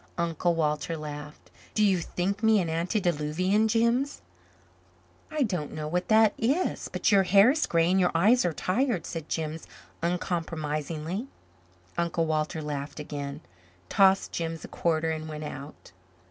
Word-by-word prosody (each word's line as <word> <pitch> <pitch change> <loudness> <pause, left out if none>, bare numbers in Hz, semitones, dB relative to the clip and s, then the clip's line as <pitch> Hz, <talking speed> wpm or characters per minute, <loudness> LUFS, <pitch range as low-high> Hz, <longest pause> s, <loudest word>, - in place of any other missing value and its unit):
Uncle 170 0 0
Walter 150 0 -1
laughed. 150 0 -8 0.2
"Do 215 - +4
you 190 -3 +3
think 190 +5 -2
me 220 -2 +5
an 170 -3 -1
antediluvian, 175 +3 +1
Jims?" 235 +5 +1 1.1
"I 305 -2 0
don't 180 - -2
know 155 -1 -4
what 180 +3 -1
that 220 -1 +5
is. 280 +11 0
But 245 - +1
your 200 -1 +6
hair 195 +5 +6
is 305 +2 0
gray 165 +1 +2
and 190 - +3
your 180 -1 +4
eyes 220 +9 +5
are 175 - +1
tired," 190 - 0
said 165 -2 -6
Jims 160 0 -3 0.3
uncompromisingly. 165 - -2 0.7
Uncle 170 -1 0
Walter 155 0 -1
laughed 145 0 -5
again, 145 -2 -5 0.5
tossed 195 -1 +4
Jims 165 -1 -4
a - - -8
quarter, 160 -1 0
and 155 0 -4
went 155 0 -6
out. 145 -5 -9
170 Hz, 145 wpm, -27 LUFS, 155-200 Hz, 1.1 s, your